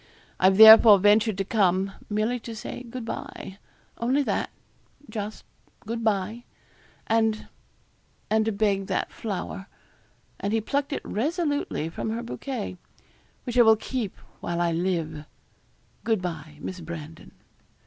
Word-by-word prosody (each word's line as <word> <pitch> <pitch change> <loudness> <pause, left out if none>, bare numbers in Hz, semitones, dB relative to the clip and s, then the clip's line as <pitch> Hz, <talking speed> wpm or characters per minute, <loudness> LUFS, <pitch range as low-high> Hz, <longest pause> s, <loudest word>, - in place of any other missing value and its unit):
I've 190 +1 +4
therefore 220 -1 +10
ventured 210 +1 +3
to 195 - -1
come, 195 -2 +1 0.2
merely 215 +4 0
to 230 0 -8
say 220 - -7
good 245 -1 -7
bye 195 -3 -7 0.4
only 260 +5 +1
that, - - -1 0.6
just 215 -1 -6 0.4
good 230 +2 -5
bye. 215 +2 -1 0.6
And 220 -1 +1 0.8
and 220 0 +2
to 225 - +1
beg 200 -2 0
that - - -2
flower' 195 -2 -5 0.7
and 200 +2 -2
he 225 - +3
plucked 280 +6 -2
it 280 - -4
resolutely 290 - -1
from 165 +6 -4
her 230 +2 -3
bouquet 240 -5 -5 0.7
'which 245 -1 -1
I - - +10
will 220 -1 +7
keep 220 -2 -4 0.2
while 175 0 -3
I 170 -1 +1
live. 165 -3 -2 0.8
Good 225 -3 +1
bye, 155 -4 -6
Miss 185 - -6
Brandon.' 165 -2 -9
215 Hz, 135 wpm, -26 LUFS, 190-230 Hz, 0.8 s, therefore